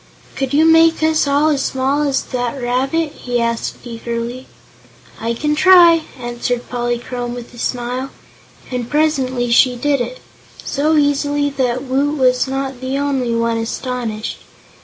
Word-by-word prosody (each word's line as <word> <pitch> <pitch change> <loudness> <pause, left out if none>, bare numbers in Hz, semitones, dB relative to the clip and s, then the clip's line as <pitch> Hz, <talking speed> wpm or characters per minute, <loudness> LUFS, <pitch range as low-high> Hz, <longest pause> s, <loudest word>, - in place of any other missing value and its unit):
"Could 270 -2 -2
you 300 +3 +4
make 325 0 +5
us 315 -2 +2
all 285 +2 +3
as 285 -3 +1
small 265 +2 0
as 280 -3 0
that 245 +1 -3
rabbit?" 270 +6 0
he 245 -1 -3
asked 230 0 -1
eagerly. 235 +2 -5 0.7
"I 230 +1 -2
can 300 +5 0
try," 340 -1 +6
answered 240 0 -3
Polychrome, 240 0 -3
with 245 0 -9
a 240 - -12
smile. 250 +2 -3 0.6
And 245 -2 -3
presently 265 -5 0
she 250 +1 +5
did 280 +2 0
it 245 +1 -5 0.5
so 305 +3 +1
easily 290 0 +1
that 255 -2 -1
Woot 280 +3 0
was 255 -1 +2
not 270 -1 -4
the 260 +1 -2
only 270 -4 0
one 230 0 0
astonished. 225 -1 -4
260 Hz, 145 wpm, -18 LUFS, 240-285 Hz, 0.7 s, try